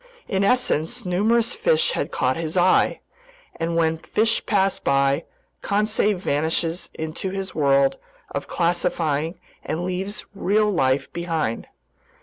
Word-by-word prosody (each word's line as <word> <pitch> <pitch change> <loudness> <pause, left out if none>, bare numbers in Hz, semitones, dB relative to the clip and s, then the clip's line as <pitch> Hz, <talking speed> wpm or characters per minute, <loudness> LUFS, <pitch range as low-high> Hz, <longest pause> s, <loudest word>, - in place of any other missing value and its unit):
In 195 -1 0
essence, 240 -2 +1
numerous 220 +6 +2
fish - - +2
had - - -2
caught 130 0 0
his 165 +1 -3
eye, 180 +1 +3 0.6
and 165 0 -2
when 160 -1 +1
fish 225 +6 +1
pass 195 -2 +2
by, 140 +3 +1 0.4
Conseil 210 0 +1
vanishes 165 +1 -1
into 160 +4 -4
his 190 0 -5
world 140 -2 +3 0.3
of - - -4
classifying 170 -2 0 0.2
and 170 +3 -3
leaves 190 +3 -4
real 210 +2 +2
life 135 -7 +1
behind. 165 -9 -2
175 Hz, 125 wpm, -23 LUFS, 160-200 Hz, 0.6 s, eye